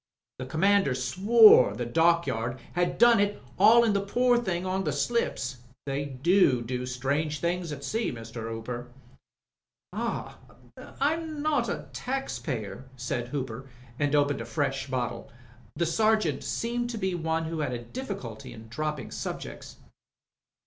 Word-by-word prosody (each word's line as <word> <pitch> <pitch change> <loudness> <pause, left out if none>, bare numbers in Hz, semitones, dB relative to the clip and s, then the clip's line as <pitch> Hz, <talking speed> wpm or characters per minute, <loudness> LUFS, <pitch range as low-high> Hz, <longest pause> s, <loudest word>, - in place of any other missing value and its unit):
The 130 - -5
commander 190 -1 +3
swore 190 - +6
the 120 - -3
dockyard 125 -5 +1 0.2
'ad 175 0 0
done 235 -2 +6
it 205 0 +1 0.2
haulin' 225 +2 +6
the 200 - +1
pore 245 +4 +2
thing 185 -6 -2
en 185 +1 -1
to 190 - -3
the - - +1
slips. 135 - -1 0.3
They 140 +1 -2
do 140 -1 +3
do 125 +1 -3
strange 140 +4 -1
things 175 -1 -1
at 140 -1 -6
sea, 225 +1 -1
Mr. 115 -1 -7
Hooper." 120 +2 -5 1.1
"Ahl - - -3 0.7
I'm 310 +1 -1
not 290 -6 +1
a - - -4
tax 270 +2 -3
payer," 120 - -5
said 120 -1 -3
Hooper, 130 -1 -5 0.3
and 145 0 +1
opened 145 -3 +2
a - - -5
fresh 135 +3 -2
bottle. 120 -3 -3 0.5
The 170 - 0
Sergeant 215 -4 +2
seemed 240 +1 -2
to 235 - -4
be 190 -3 -1
one 165 -1 -1
who 160 0 -4
had 145 -4 -1
a 120 -1 -4
difficulty 190 - -7
in 110 0 -12
dropping 150 0 -4
subjects. - - -6
155 Hz, 150 wpm, -28 LUFS, 125-205 Hz, 1.1 s, swore